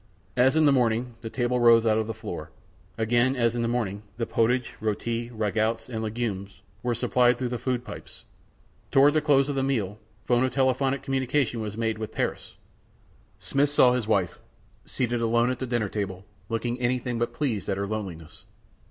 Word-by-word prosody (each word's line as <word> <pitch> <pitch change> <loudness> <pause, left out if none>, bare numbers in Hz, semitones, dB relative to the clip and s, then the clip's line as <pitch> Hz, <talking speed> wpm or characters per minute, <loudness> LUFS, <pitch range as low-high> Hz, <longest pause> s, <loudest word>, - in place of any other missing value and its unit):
As 130 +4 +4
in 160 -1 +4
the 145 - +6
morning, 120 -2 +1
the 115 - -5
table 125 +1 0
rose 115 -1 +6
out 110 -1 +3
of 110 - -2
the 115 - -3
floor. 80 -3 -7 0.5
Again, 120 +4 +2
as 120 -2 +1
in 120 - -1
the 115 - 0
morning, 110 -4 -2 0.2
the 115 - -1
potage, 120 +3 +1
r├┤ti, 115 +2 -2
rago├╗ts, 110 +1 -1
and 110 -3 -4
legumes 105 -4 -4 0.2
were 120 -1 -1
supplied 125 0 +3
through 125 -1 -2
the 120 -1 -3
food 125 -2 -2
pipes. - - -10 0.7
Toward 140 +2 +5
the 155 - +2
close 140 -3 +3
of 145 - -1
the 135 - +1
meal, 110 -7 -1 0.3
phonotelephotic 130 +2 +1
communication 130 -2 0
was 105 -1 -5
made 110 -1 -1
with 110 - -5
Paris. - - -3 0.8
Smith 140 +1 +1
saw 130 -4 +5
his 125 -4 -1
wife, 95 -5 0 0.5
seated 120 -2 -1
alone 120 +2 +2
at 130 - -4
the 130 - -3
dinner 120 -3 0
table, 95 -2 -4 0.2
looking 120 +2 -2
anything 125 -1 -1
but 120 - 0
pleased 115 - -2
at 95 - 0
her 100 - -1
loneliness. 90 -6 -6
120 Hz, 180 wpm, -26 LUFS, 110-125 Hz, 0.8 s, the